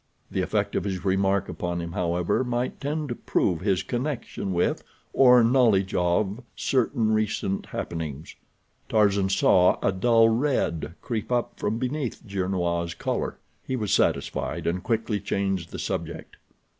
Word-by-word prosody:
The - - 0
effect - - -1
of - - 0
his 95 -3 -4
remark 95 0 +2
upon 85 -1 -3
him, 85 0 -5
however, 90 +5 0
might 120 0 -2
tend 150 +1 -2
to - - -1
prove 90 -6 0
his 95 -1 +1
connection 120 -3 -3
with, 85 -1 0 0.3
or 125 -2 +7
knowledge 115 -6 +3
of, 95 +5 +1
certain 120 -3 +1
recent 110 -2 -1
happenings. 80 -3 -5 0.5
Tarzan 100 -3 +3
saw 90 -1 +4
a - - +3
dull 115 +4 +4
red 115 - 0
creep 115 -1 -3
up 120 -1 -1
from 110 +2 -1
beneath 130 0 -3
Gernois' 90 -4 -1
collar. - - -2 0.3
He 130 - -3
was 105 -5 -1
satisfied, - - 0
and 90 +2 0
quickly 110 -2 -1
changed 95 -3 -2
the - - -7
subject. - - -5
100 Hz, 145 wpm, -26 LUFS, 90-120 Hz, 0.5 s, or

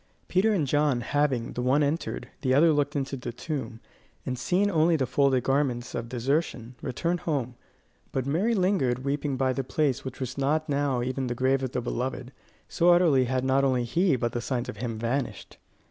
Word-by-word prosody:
Peter 195 +4 +2
and 180 -8 +1
John, 145 -2 +1
having, 135 -3 0
the 125 - -3
one 135 +4 +3
entered, 150 +4 -2
the 130 -1 +2
other 160 +3 +5
looked 145 0 0
into 135 -1 -2
the 125 -2 -5
tomb, 125 -3 -5 0.5
and 130 - -2
seen 180 +10 +1
only 165 0 +3
the 135 -4 +1
folded 130 0 +2
garments 135 -3 0
of 115 -1 -4
desertion, 125 -1 -1
returned 170 +7 -1
home, 135 -8 -2 0.6
but 130 -2 -2
Mary 185 +12 +1
lingered 140 - +1
weeping 140 -1 -1
by 130 0 +1
the 135 - -2
place 135 -1 0
which 130 - -7
was 130 +1 -4
not 155 +3 +1
now 140 -4 0
even 130 +1 -2
the 120 - -2
grave 130 +2 +2
of 130 -2 -3
the 125 - -1
beloved, 125 +1 -3 0.4
so 175 +1 +2
utterly 170 -7 +5
had 130 +1 -1
not 135 +1 +3
only 130 -2 +2
he 165 +6 +2
but 120 -1 -1
the 120 - -3
signs 125 -1 -2
of - - -6
him 115 0 -4
vanished. 120 +4 -3
135 Hz, 195 wpm, -27 LUFS, 125-150 Hz, 0.6 s, other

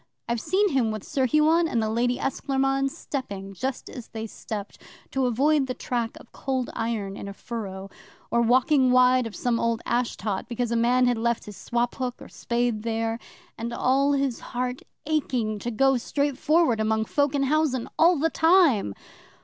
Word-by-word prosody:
I've 235 -1 -1
seen 405 +2 +2
him 260 -7 +1
with 215 -2 -4
Sir 265 -2 0
Huon 315 +4 +4
and 240 - 0
the 220 - 0
Lady 240 +3 +1
Esclairmonde 270 0 0
stepping 200 -9 -6
just 260 +6 -4
as 245 -4 -9
they 225 -1 -6
stepped 210 -1 -7 0.3
to 265 -1 +1
avoid 275 +4 +2
the 255 - -3
track 235 -2 -3
of - - -17
Cold 260 -2 -3
Iron 220 -4 -3
in 200 - -7
a 200 - -6
furrow, 195 -3 -6 0.4
or 235 - +3
walking 255 +3 +4
wide 255 -1 +5
of 220 - -9
some 240 -2 0
old 230 -1 0
ash 240 0 0
tot 205 +1 -3
because 240 0 -2
a - - +1
man 245 +2 +3
had 245 -2 +1
left 235 0 0
his 210 - -9
swop 240 +6 -1
hook 250 -2 -4
or - - -11
spade 235 -2 -1
there; 225 0 -2 0.4
and 230 +1 -3
all 275 +4 +2
his 275 -3 0
heart 250 +1 -4 0.2
aching 250 -8 -1
to 235 - -3
go 270 +3 +3
straightforward 285 0 +1
among 220 0 +1
folk 285 +4 +1
in 275 - +1
housen 275 -3 +1
all 335 +1 +6
the 320 +3 +1
time. 320 - +4
245 Hz, 180 wpm, -25 LUFS, 225-270 Hz, 0.4 s, all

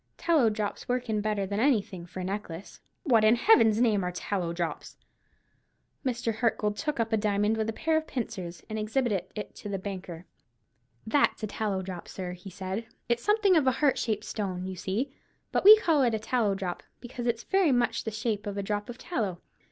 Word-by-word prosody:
"Tallow 310 -9 +3
drops 210 +1 -4
work 245 -2 -1
in 210 -1 +1
better 210 -2 0
than 200 +2 -2
anything 205 -9 +1
for 180 +1 -7
a - - -4
necklace." 190 -2 -6 0.2
"What, 235 - +4
in 215 +2 +6
Heaven's 230 - +5
name, 215 -5 +3
are 180 - -1
tallow 180 -1 -2
drops?" 170 -1 -4 1.1
Mr. 245 -3 -1
Hartgold 220 -2 +1
took 300 +2 -3
up 225 0 0
a - - +4
diamond 210 0 +1
with 220 0 -1
a - - -2
pair 320 +6 +1
of 315 - -2
pincers, 190 -8 -5
and 220 0 -4
exhibited 215 -4 0
it 210 - -6
to 205 - -8
the 200 - -2
banker. 185 -3 -7 0.8
"That's 260 -1 +2
a - - 0
tallow 200 -2 -2
drop, 180 -2 -7
sir," 185 -2 -5
he 180 +2 -10
said. 190 +4 -5 0.2
"It's 235 0 +1
something 415 -3 +4
of 300 -5 +3
a 260 - +4
heart 285 -1 +2
shaped 215 -3 -1
stone, 185 -4 -3
you 190 0 -5
see; 210 +10 -2 0.4
but - - +1
we 425 +2 +11
call 325 -9 +2
it 240 -4 +3
a - - -2
tallow 220 -2 +1
drop, 185 -2 -4 0.2
because 245 0 -6
it's 235 -1 0
very 385 -6 +3
much 245 -1 +1
the - - -2
shape 215 -1 -2
of 205 0 -4
a 200 - -1
drop 205 +2 -3
of 240 - -7
tallow. 215 - -3
215 Hz, 205 wpm, -28 LUFS, 195-245 Hz, 1.1 s, we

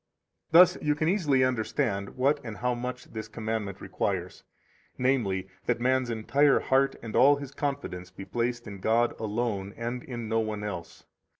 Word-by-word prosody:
13 165 - +8
Thus 180 - +5
you 150 -1 +2
can 155 +1 0
easily 155 -8 +3
understand 115 -4 -1
what 140 +3 +3
and 110 -3 -6
how 125 0 0
much 125 +1 -5
this 110 -1 -5
commandment 110 -3 -4
requires, - - -3 0.5
namely, 115 -8 +1 0.2
that 120 -1 +1
man's 130 0 +1
entire 135 +6 +3
heart 135 +1 +2
and 115 - -6
all 140 +3 +7
his 140 -2 -7
confidence 140 -12 -4
be 95 +1 -9
placed 120 +1 -2
in 100 -3 -8
God 115 +4 +2
alone, 105 -3 -2
and 120 +2 -3
in 120 -3 -6
no 110 +1 +1
one 110 -2 -2
else. 100 -5 -6
120 Hz, 170 wpm, -28 LUFS, 110-135 Hz, 0.5 s, 13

